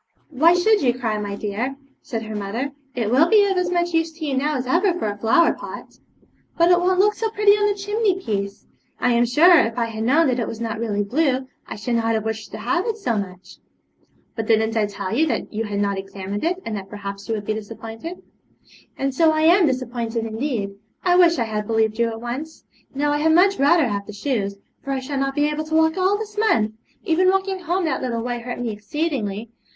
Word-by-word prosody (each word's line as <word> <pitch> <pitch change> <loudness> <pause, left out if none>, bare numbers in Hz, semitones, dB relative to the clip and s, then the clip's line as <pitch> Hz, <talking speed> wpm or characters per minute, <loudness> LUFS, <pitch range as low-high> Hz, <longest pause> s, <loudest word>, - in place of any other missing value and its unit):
'Why 320 +5 +5
should 410 +3 +3
you 245 -2 +2
cry, 220 -4 -1
my 205 -1 -4
dear?' 215 +6 -3 0.3
said 225 -5 -5
her 220 0 -6
mother; 215 +7 -3 0.2
'it 230 -3 -1
will 300 +7 +4
be 420 -2 +6
of 390 -1 0
as 360 -1 0
much 345 -1 0
use 325 0 +1
to 315 0 -6
you 280 -3 -1
now 295 +3 0
as 255 - -3
ever 350 +7 +2
for - - -3
a 205 - -2
flower 225 +11 +3
pot.' - - -10 0.6
'But 340 +1 +5
it 355 - +5
won't 365 +1 +2
look 420 +2 +4
so 445 +1 -2
pretty 420 -1 +4
on 415 0 +3
the 410 -1 0
chimney 410 -1 0
piece. 200 - -4 0.3
I 250 - +2
am 240 0 +3
sure, 325 +8 +6
if 225 +1 0
I 235 - +1
had 220 -1 -5
known 290 +8 +4
that 255 -3 +1
it 230 - -1
was 225 - -6
not 225 -2 -3
really 205 -3 -1
blue, 260 +3 0 0.2
I - - -6
should 220 +3 -3
not 225 0 +1
have 220 0 -2
wished 220 -1 -4
to - - -7
have 255 - -1
it 450 -1 -1
so 245 - -1
much.' 185 -2 -6 0.8
'But 225 -2 -4
didn't 220 0 +2
I 215 -2 +2
tell 200 0 -4
you 320 +5 +3
that - - -3
you 225 +2 -2
had 205 -1 -3
not 200 -1 0
examined 195 +1 -6
it, 355 +3 0
and 225 - -3
that 195 -1 -8
perhaps 200 -1 -7
you 225 - +1
would 205 -1 -5
be 215 - 0
disappointed?' 225 - -8 0.7
'And 275 0 -1
so 320 +4 +4
I 310 0 0
am 340 +2 +5
disappointed, 240 -3 -2
indeed. 225 -2 -2 0.3
I 355 -1 +3
wish 345 -2 +5
I 235 - +1
had 210 -2 -3
believed 220 -1 +1
you 235 - +3
at 225 0 -6
once. 270 +7 -6 0.3
Now 290 +1 +1
I 295 - +1
had 320 +1 +3
much 390 +1 +4
rather 290 +1 +4
have 200 -2 -3
the 210 - -8
shoes, 205 -3 -2 0.3
for 275 - -2
I 265 - -1
shall 270 +1 -4
not 275 0 -1
be 290 - +2
able 300 +1 -2
to 315 0 -2
walk 320 0 +3
all 380 +2 +2
this 420 -1 -6
month; 225 - +2 0.3
even 360 +3 +3
walking 385 0 0
home 355 +1 -1
that 315 - -1
little 235 -2 -2
way 245 0 -3
hurt 245 +1 -6
me 240 -2 -2
exceedingly. 215 -1 -3
255 Hz, 240 wpm, -22 LUFS, 220-335 Hz, 0.8 s, be